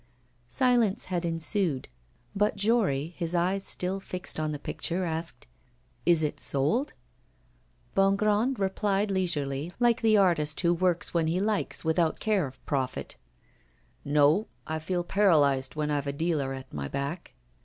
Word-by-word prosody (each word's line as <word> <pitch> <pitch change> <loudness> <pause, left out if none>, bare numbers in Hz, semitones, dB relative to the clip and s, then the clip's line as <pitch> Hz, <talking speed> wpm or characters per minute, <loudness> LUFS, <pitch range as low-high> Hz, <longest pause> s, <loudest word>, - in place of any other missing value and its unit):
Silence 235 - +2
had 175 -1 0
ensued, 165 -2 0 0.5
but 210 +2 +2
Jory, 200 - +1
his 170 -1 -2
eyes 185 +3 +1
still 185 +1 -1
fixed 185 -4 -5
on 155 -1 -1
the 150 - -3
picture, 175 +5 -3
asked: 160 -7 -4 0.6
'Is 170 -2 +5
it 150 - -2
sold?' 155 - 0 1.0
Bongrand 210 +6 +2
replied 200 +1 0
leisurely, 155 -5 -1
like 240 -1 +3
the 220 -2 +4
artist 165 -6 +2
who 170 -1 +3
works 175 0 0
when 165 -2 +1
he 170 +3 0
likes 210 -4 -1
without 160 0 +1
care 210 -8 +1
of 130 0 -15
profit: 130 -3 -2 0.9
'No; 150 +7 +3 0.2
I 160 0 -3
feel 175 +2 -2
paralysed 150 -9 +3
when 150 -1 -1
I've 145 -1 -1
a 140 - -1
dealer 150 -3 -1
at 135 -1 -8
my 70 -1 -3
back. 140 - -5
170 Hz, 145 wpm, -28 LUFS, 150-195 Hz, 1.0 s, Is